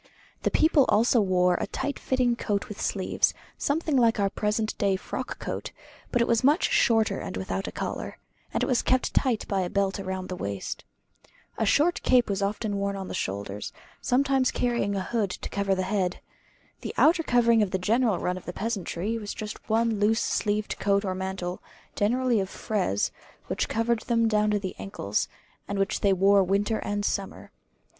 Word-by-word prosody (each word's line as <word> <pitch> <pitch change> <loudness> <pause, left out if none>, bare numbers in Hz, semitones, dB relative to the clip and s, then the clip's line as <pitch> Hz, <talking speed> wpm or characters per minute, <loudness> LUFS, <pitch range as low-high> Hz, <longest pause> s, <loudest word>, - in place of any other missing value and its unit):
The - - +1
people 310 -4 +4
also 230 +2 +4
wore 180 -2 +3
a - - -1
tight 285 - -3
fitting 250 -2 +1
coat 205 -2 -2
with 210 -3 -8
sleeves, 190 -2 +1 0.2
something 305 +1 0
like 230 -3 +4
our 200 -1 +1
present 215 +1 -1 0.2
frock - - -5
coat; - - -5 0.4
but 245 -2 +3
it - - -2
was 230 0 +2
much 295 +7 +3
shorter 225 -2 +3
and - - -5
without - - -3
a - - -4
collar, - - -5 0.3
and - - 0
it - - +3
was 250 -3 +2
kept 255 0 +1
tight 250 -5 +1
by 195 -2 0
a 180 - -2
belt 200 +1 0
round 190 -1 -4
the 185 - -3
waist. 100 - -4 0.8
A 220 - +1
short 320 +10 +3
cape 245 -4 +3
was 200 0 -1
often 205 +1 -1
worn 200 0 -1
on 190 -1 -6
the - - -5
shoulders, 100 +1 -4 0.3
sometimes 265 0 +2
carrying 235 -5 0
a 190 - -1
hood 215 -1 -1
to - - -6
cover 200 -1 0
the 185 - -1
head. 185 -2 -1 0.6
The - - -6
outer 330 +2 +5
covering 235 -5 +4
of 205 - +1
the 190 - 0
general 220 +2 +2
run 180 +1 -2
of 185 - -10
the 180 - -5
peasantry 210 0 -2
was 205 -2 -6
just 215 0 -7
one 225 -1 +2
loose 220 +2 +3
sleeved 210 -1 -1
coat 200 0 +2
or 190 - -1
mantle, 190 -1 -4 0.3
generally 240 +2 +2
of 190 -1 -2
frieze, 190 - -1 0.3
which - - -2
covered 230 +1 +1
them 230 0 +1
down 210 -1 +2
to 210 - +2
the 190 -2 -5
ankles; 100 +1 -2 0.4
and 200 - -3
which 195 0 0
they 200 - +3
wore 195 +1 +5
winter 200 +4 +1
and 205 0 -2
summer. 195 -2 -3
210 Hz, 190 wpm, -27 LUFS, 190-235 Hz, 0.8 s, outer